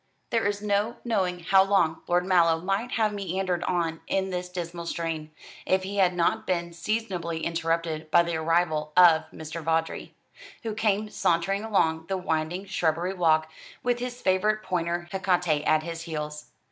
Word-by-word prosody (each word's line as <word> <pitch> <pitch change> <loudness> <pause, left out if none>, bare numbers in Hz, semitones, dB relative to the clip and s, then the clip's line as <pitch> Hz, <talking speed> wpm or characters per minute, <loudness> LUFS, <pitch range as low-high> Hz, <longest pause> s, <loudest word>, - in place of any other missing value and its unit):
There 225 -3 +2
is 205 0 -2
no 210 +3 +1
knowing 185 -6 0
how 190 +3 +5
long 190 -5 +2
Lord 175 +1 +2
Mallow 170 -3 +4
might 195 +7 -2
have 215 -2 +1
meandered 185 -2 -2
on 165 -2 -1
in 190 0 0
this 180 0 -3
dismal 170 -1 -5
strain, 165 -2 -3 0.3
if 190 0 +1
he 200 +2 -5
had 180 -2 +3
not 170 -1 +1
been 170 -2 -1
seasonably 170 -3 -3
interrupted 165 -1 -1
by 170 +2 +5
the 170 -1 -2
arrival 160 -2 0
of 165 -3 +7
Mr. 160 +1 -7
Vawdrey, 160 +1 -1 0.5
who 225 -2 -3
came 210 -1 0
sauntering 195 +4 +1
along 160 -7 +1
the 195 - -1
winding 175 +1 -2
shrubbery 170 0 0
walk, 160 -3 +2 0.3
with 245 0 +1
his 245 0 -5
favourite 210 +3 +2
pointer 175 -1 -2
Hecate 180 -5 +1
at 155 0 +3
his 165 0 -5
heels. 150 -2 -5
175 Hz, 160 wpm, -26 LUFS, 165-195 Hz, 0.5 s, of